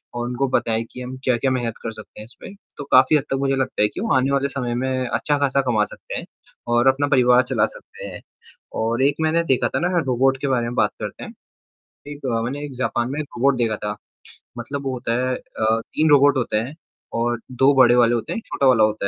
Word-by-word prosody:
और 120 0 -2
उनको 125 +3 -1
बताएँ 115 -3 0
कि 125 - -9
हम 125 +1 -7
क्या-क्या 130 +1 +1
मेहनत 120 -3 -1
कर 115 - -3
सकते 110 -1 -13
हैं - - -9
इसमें। 125 - -12 0.2
तो - - -5
काफ़ी 130 +4 +6
हद 140 - -2
तक - - +2
मुझे 135 0 +1
लगता 135 -4 -1
है 105 - +5
कि - - -7
वो 225 - 0
आने 130 +1 +2
वाले 140 0 +1
समय 125 -3 -3
में 130 0 -1
अच्छा 130 +6 0
खासा 140 -1 +2
कमा 110 -4 +2
सकते - - -9
हैं - - -8 0.5
और 120 +2 +3
अपना 140 +2 +3
परिवार 125 -2 +4
चला - - +1
सकते - - -12
हैं। - - -9 0.6
और 115 +3 0
एक 140 +1 +3
मैंने 160 +1 +2
देखा 130 -6 +1
था - - +2
ना 180 +1 0
रोबोट 135 +1 +2
के 140 - -1
बारे 125 -3 +1
में 120 +1 -4
बात - - +2
करते - - -6
हैं। - - -9 0.8
एक 145 -1 -7
अ, 115 -3 0
मैंने 140 +5 -4
एक 145 - -7
जापान 125 -1 -1
में 150 - -3
एक 150 - -4
रोबोट 135 +2 +3
देखा 115 -3 0
था। 105 0 -3 0.6
मतलब 140 +4 -5
वो 135 - -1
होता 120 -2 -3
है 130 - 0
अ, 110 -1 -1
3 155 +6 0
रोबोट 145 -1 +5
होते 120 -4 0
हैं 120 +7 -3 0.4
और 120 0 0
2 135 +3 +4
बड़े 125 -2 +6
वाले 120 -1 +4
होते 115 - -4
हैं, - - -4
1 - - -17
छोटा 140 - +1
वाला 120 -4 +5
होता 110 -2 0
130 Hz, 240 wpm, -21 LUFS, 120-140 Hz, 0.8 s, काफ़ी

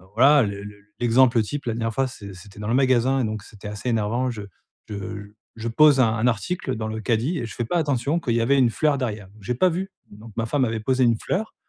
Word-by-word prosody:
voilà, 140 +2 +6
le 100 -1 -4
le 105 0 -9 0.2
l'exemple 120 0 +4
type, 145 +6 -5
la 115 - 0
dernière 115 -1 -2
fois, 135 +2 +1
c'est 100 -6 -10
c'était 100 +2 -14
dans 105 - -5
le 115 - 0
magasin 130 0 +3
et - - 0
donc 110 -1 -4
c'était 105 -1 -10
assez 105 +4 -7
énervant, 115 +3 0
je 110 -4 -5 0.5
je 100 0 -6 0.2
je 115 +1 -5
pose 145 +2 +5
un 110 -2 +3
un 115 +2 +1
article 130 - -1
dans 110 0 -4
le 110 0 -4
caddie 125 - 0
et 120 - -3
je 110 - -9
fais 120 - -2
pas 175 - -1
attention 145 +1 0
qu'il 120 -8 -1
y 115 - +2
avait 135 +4 +3
une 125 -3 +4
fleur 150 +1 +1
derrière. 105 -6 -4
J'ai 120 +4 -2
pas 185 +8 +3
vu, 190 +4 -3 0.2
donc 105 +1 -13
ma 115 - 0
femme 130 +2 +1
avait 110 -1 -3
posé 130 +2 +1
une 115 -1 +3
fleur 215 +4 -3
115 Hz, 250 wpm, -23 LUFS, 110-135 Hz, 0.5 s, voilà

